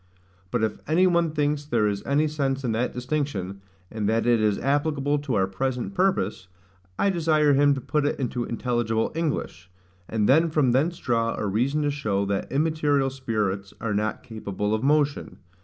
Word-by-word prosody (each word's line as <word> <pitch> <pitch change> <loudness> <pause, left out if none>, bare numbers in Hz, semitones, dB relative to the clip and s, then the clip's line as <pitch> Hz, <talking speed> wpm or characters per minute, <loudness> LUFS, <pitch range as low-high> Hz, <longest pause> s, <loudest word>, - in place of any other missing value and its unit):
But 115 +2 -1
if 110 - -1
any 165 +5 +4
one 170 -2 +3
thinks 150 -1 0
there 120 -7 +1
is 100 -1 -2
any 145 +3 +2
sense 135 -3 -1
in 120 - 0
that 115 +3 0
distinction, 125 -8 -3 0.3
and 110 -2 -1
that 115 +1 +1
it 120 -2 +3
is 105 -2 +2
applicable 145 0 0
to 140 -5 -2
our 95 - +3
present 125 - -3
purpose, 180 - 0 0.5
I 200 - +2
desire 155 -4 +3
him 145 +1 +4
to 135 - -5
put 150 +3 0
it - - -2
into 125 -2 -2
intelligible 120 -2 -1
English; 145 - -3 0.4
and 110 -2 +1
then 160 +5 +4
from 150 -5 +2
thence 155 +8 +1
draw 115 -2 0
a - - -2
reason 125 +9 0
to 145 - +1
show 105 -8 -1
that 100 0 -2
immaterial 145 -2 +1
spirits 105 -7 -3
are 110 -2 -2
not 105 +1 -2
capable 105 -2 -3
of 110 - 0
motion. 145 +1 +1
130 Hz, 180 wpm, -25 LUFS, 110-150 Hz, 0.5 s, any